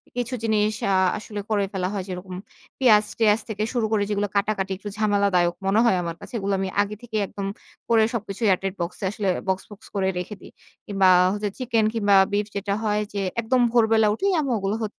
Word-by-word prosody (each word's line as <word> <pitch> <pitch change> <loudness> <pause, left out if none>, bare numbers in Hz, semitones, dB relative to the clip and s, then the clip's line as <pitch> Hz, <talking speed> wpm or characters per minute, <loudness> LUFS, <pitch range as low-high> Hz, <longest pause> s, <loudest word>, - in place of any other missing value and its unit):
কিছু 245 +1 -3
জিনিস 215 -1 +2 0.2
আ - - +3 0.2
আসলে 210 0 -7
করে 205 -2 +1
ফেলা 185 -1 -1
হয়। 195 -2 -2
যেরকম, 180 0 -6 0.4
পেঁয়াজ-টেয়াজ 215 -2 +4
থেকে 210 0 -2
শুরু 235 -3 +1
করে, 210 -2 +2
যেগুলো 205 0 0
কাটাকাটি, 200 -1 0
একটু 205 +1 -7
ঝামেলাদায়ক 200 -5 +2
মনে 200 +3 +3
হয়, 230 - +4
আমার 170 -1 -4
কাছে। - - -11
এগুলো 200 0 -1
আমি 190 -1 -1
আগে 205 +1 -3
থেকেই 220 -3 -3
একদম 200 -1 -6 0.4
করে, 225 -1 +5
সবকিছুই 220 0 -3
এয়ার 185 -2 +3
টাইট 195 0 -3
বক্স 170 +1 -4
এ - - +1
আসলে 200 -2 -2 0.2
বক্স, 190 0 0
বক্স, 205 +1 -13
করে 190 -1 +1
রেখে 205 +4 -6
দেই। - - -13 0.4
কিংবা, 195 -2 +3 0.5
চিকেন 235 -4 +1
কিংবা 205 -3 +3 0.2
বিফ 205 0 +1
যেটা 200 0 -1
হয় 210 0 +1
যে, 200 - -2 0.2
একদম 250 +3 +1
ভোরবেলা 220 -2 +4
উঠেই 390 - 0
আম্মু 270 -3 -1
ওগুলো 195 +3 -1
হ - - 0
205 Hz, 200 wpm, -24 LUFS, 195-220 Hz, 0.5 s, করে